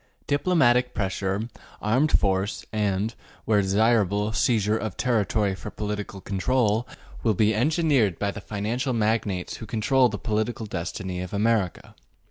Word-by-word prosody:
Diplomatic 140 -5 +2
pressure, 95 +2 -1 0.3
armed 130 +9 +2
force, 95 +1 -1
and, 105 +1 0 0.3
where 105 -2 +3
desirable, 105 +1 +2
seizure 110 -3 +2
of 110 -3 -4
territory 105 -4 +1
for 95 +3 -7
political 105 -2 -5
control, 110 +3 0 0.3
will 110 -3 +2
be 110 +2 +3
engineered 135 - +2
by 100 0 -1
the 105 - -8
financial 110 +6 -2
magnates 105 -5 -1
who 110 - -9
control 120 +4 +3
the 105 - -4
political 110 +1 -2
destiny 90 -1 -4
of 90 +2 -5
America. 105 -3 0
105 Hz, 130 wpm, -25 LUFS, 100-115 Hz, 0.3 s, where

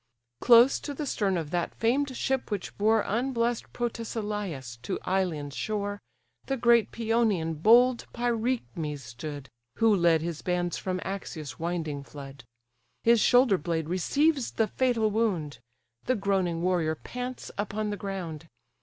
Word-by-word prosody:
Close 240 +2 +6
to 285 - -6
the 300 - -3
stern 200 -8 0
of 160 -2 -4
that 175 -1 -2
famed 260 +3 0
ship 265 -1 -1
which 205 -4 -4
bore 220 +1 +3
Unbless'd 235 0 -1
Protesilaus 210 - -4
to 130 - -3
Ilion's 165 -7 -1
shore, 205 -1 -2 0.5
The 270 - -1
great 235 -3 +4
Pæonian, 220 -9 0
bold 240 +4 +5
Pyrechmes 225 - -2
stood; 140 +4 -7 0.3
(Who 225 -2 +4
led 170 -3 +3
his 165 -2 -4
bands 175 -1 -1
from 185 -1 -3
Axius' 165 -7 -6
winding 160 -4 -3
flood;) 140 -3 -10 0.6
His 235 0 +5
shoulder 245 -6 +5
blade 160 0 -2
receives 275 - +1
the 225 - +2
fatal 235 -4 +1
wound; 180 - -1 0.5
The 255 - +2
groaning 190 -4 0
warrior 175 -4 +1
pants 250 +8 -6
upon 210 +1 -2
the - - -2
ground. 175 -6 -5
200 Hz, 135 wpm, -28 LUFS, 165-235 Hz, 0.6 s, Close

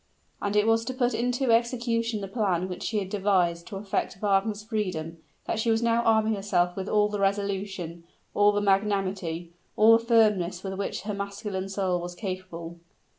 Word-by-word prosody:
And 205 0 -1
it 210 0 +4
was 225 0 +3
to 255 - -4
put 245 -2 +1
into 245 +2 0
execution 230 -1 +1
the 195 - -4
plan 190 -4 0
which 180 -1 -6
she 220 - -2
had 200 -2 -1
devised 180 -4 +1
to 205 - -7
effect 195 -1 -2
Wagner's 205 +1 +1
freedom, 180 -7 -3 0.3
that 220 - -2
she 230 - 0
was 225 +1 +2
now 235 0 +3
arming 220 -1 +3
herself 180 -3 0
with 190 0 -4
all 210 -1 +3
the 210 -1 -4
resolution, 195 -4 -2 0.3
all 205 0 +5
the 205 0 0
magnanimity, 195 -4 0 0.2
all 225 +1 +7
the 230 - +1
firmness 210 -6 +2
with 190 -1 -4
which 195 -1 -3
her 210 +1 -3
masculine 200 -1 -4
soul 190 -3 -1
was 175 0 -6
capable. 180 -4 -6
200 Hz, 180 wpm, -27 LUFS, 185-220 Hz, 0.3 s, all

